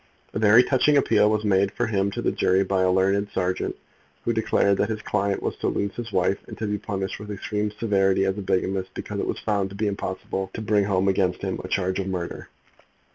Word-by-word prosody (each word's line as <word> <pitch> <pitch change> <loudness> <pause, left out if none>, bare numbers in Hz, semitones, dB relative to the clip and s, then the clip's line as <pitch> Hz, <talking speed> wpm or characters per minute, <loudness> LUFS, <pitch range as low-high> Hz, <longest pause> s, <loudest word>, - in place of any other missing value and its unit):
A - - -2
very 110 +3 +7
touching 145 +3 +3
appeal 105 -6 +4
was 105 0 0
made 100 -1 +2
for - - 0
him 100 -3 0
to - - -5
the - - +2
jury 95 +1 +2
by 95 0 0
a 95 - +3
learned 95 +2 +2
serjeant, 90 0 -1 0.5
who 115 - +1
declared 100 -3 +2
that - - +1
his 110 -1 -4
client 100 -1 -1
was - - -2
to - - -2
lose 100 -1 -1
his 120 -2 -6
wife 95 +1 +1
and - - -9
to 110 - -3
be 105 -1 -2
punished 95 -2 -4
with 105 0 -9
extreme 105 +1 -2
severity 95 -3 +1
as 95 0 0
a 105 - -5
bigamist, 95 0 -1
because 105 -1 -5
it - - -2
was - - -2
found 100 -3 -1
to 100 - -10
be 105 +2 -1
impossible 95 -1 -3
to - - -4
bring 105 -2 +2
home 95 -1 +1
against 95 -1 +1
him 95 -1 -2
a - - -5
charge 95 0 -1
of 95 - -2
murder. 90 -3 -4
100 Hz, 235 wpm, -24 LUFS, 95-105 Hz, 0.5 s, very